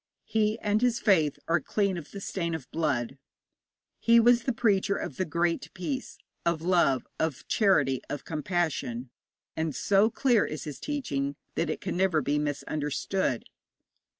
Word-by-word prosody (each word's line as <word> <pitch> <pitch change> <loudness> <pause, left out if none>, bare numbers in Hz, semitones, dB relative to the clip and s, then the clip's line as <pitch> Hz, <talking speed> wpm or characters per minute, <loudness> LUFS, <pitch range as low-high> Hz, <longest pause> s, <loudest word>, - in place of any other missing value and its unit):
He 215 0 +1
and 210 +1 +1
his 245 -2 +2
faith 165 -10 +3
are 170 0 +3
clean 200 +4 0
of 170 -4 -7
the 200 - -8
stain 170 -4 -2
of 140 -6 -7
blood. 135 -5 -1 0.8
He 235 0 +6
was 240 +1 +5
the 260 - +2
preacher 210 -4 +2
of 135 - -5
the 185 - 0
Great 170 +1 -1
Peace, 260 +9 -4 0.3
of 170 -2 0
love, 170 -8 +3
of 160 -4 -2
charity, 145 - +3
of 145 - -5
compassion, 150 -7 -2 0.4
and 160 -3 -2
so 200 - +3
clear 240 -2 +3
is 155 - -4
his 150 -2 -7
teaching 140 - -2 0.2
that 165 - -1
it 155 - -3
can - - -3
never 185 -4 +3
be 150 0 0
misunderstood. 150 0 -1
170 Hz, 155 wpm, -28 LUFS, 145-205 Hz, 0.8 s, He